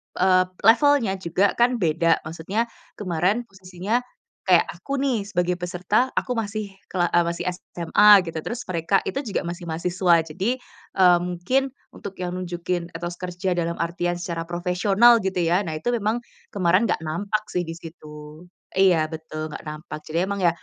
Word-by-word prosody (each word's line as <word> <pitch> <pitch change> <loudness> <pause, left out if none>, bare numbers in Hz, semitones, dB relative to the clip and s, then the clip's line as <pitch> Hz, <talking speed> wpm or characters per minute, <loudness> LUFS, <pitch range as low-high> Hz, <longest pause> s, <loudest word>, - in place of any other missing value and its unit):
eee, 185 0 +4 0.2
levelnya 230 -3 +4
juga 185 +3 +1
kan 245 +1 +4
beda. 165 -4 +1
Maksudnya 185 +9 -3 0.2
kemarin 185 +4 0
posisinya 190 +1 -3 0.5
kayak 180 -2 +6 0.2
aku 275 +9 -4
nih, 260 -6 0
sebagai 180 -2 0
peserta, 180 +7 0
aku - - -6
masih 215 0 -3 0.2
kela 175 -2 0
eee, 175 - +4
masih 170 - -3
SMA 180 +2 +1 0.2
gitu. 165 -2 -5
Terus 240 +1 -4
mereka 180 +2 0
itu - - -3
juga 195 - -2
masih 175 +1 -6
mahasiswa. 170 +1 +2
Jadi, 185 +10 -2 0.4
eee, 180 -2 +6
mungkin 180 +10 0 0.2
untuk 200 -1 -9
yang 180 -1 -4
nunjukin 175 -1 -3
etos 175 +1 -5
kerja 180 +1 -3
dalam 170 -1 -1
artian 175 +1 -2
secara 170 -1 -5
profesional, 195 +7 +4
gitu 190 -2 -2
ya. 175 +3 +3
Nah, 160 - -3
itu 200 +10 -2
memang 230 +1 -1 0.2
kemarin 185 +3 +2
nggak 160 - -1
nampak 200 +7 -2
sih 175 -2 -1
di 165 - -5
situ. 155 -1 -11 0.3
Iya, 185 -5 +4
betul 155 -1 -6
nggak - - -8
nampak. 155 0 -7
Jadi 155 +1 -5
emang 200 0 -3
ya 175 - +5
180 Hz, 165 wpm, -23 LUFS, 170-200 Hz, 0.5 s, kayak